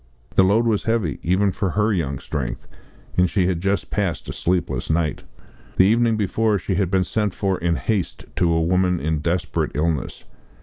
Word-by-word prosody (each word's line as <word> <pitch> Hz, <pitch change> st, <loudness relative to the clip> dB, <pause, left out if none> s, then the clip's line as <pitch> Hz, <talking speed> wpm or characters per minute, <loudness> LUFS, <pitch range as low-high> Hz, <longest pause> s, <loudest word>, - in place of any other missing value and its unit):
The -, -, +5 dB
load 105 Hz, +5 st, +3 dB
was 110 Hz, -3 st, +2 dB
heavy, 110 Hz, -9 st, 0 dB
even 95 Hz, +3 st, +2 dB
for 95 Hz, +1 st, -2 dB
her 105 Hz, +4 st, +1 dB
young 70 Hz, -7 st, -1 dB
strength, 60 Hz, -2 st, -5 dB, 0.5 s
and 90 Hz, 0 st, +4 dB
she 95 Hz, -1 st, +1 dB
had 90 Hz, -2 st, 0 dB
just 100 Hz, +2 st, -1 dB
passed 100 Hz, -5 st, -2 dB
a -, -, -4 dB
sleepless 90 Hz, -1 st, -1 dB
night. 80 Hz, -2 st, 0 dB, 0.6 s
The 95 Hz, -, +6 dB
evening 115 Hz, +2 st, +3 dB
before 110 Hz, +1 st, +1 dB
she 95 Hz, +1 st, -3 dB
had 95 Hz, -1 st, +1 dB
been 95 Hz, 0 st, +2 dB
sent 105 Hz, 0 st, -1 dB
for 95 Hz, -2 st, -1 dB
in 85 Hz, 0 st, +1 dB
haste 90 Hz, -, -2 dB
to 85 Hz, -, +3 dB
a 80 Hz, 0 st, +2 dB
woman 90 Hz, +1 st, +2 dB
in 80 Hz, 0 st, -1 dB
desperate 85 Hz, +3 st, -1 dB
illness. 75 Hz, -2 st, -1 dB
90 Hz, 185 wpm, -22 LUFS, 85-100 Hz, 0.6 s, The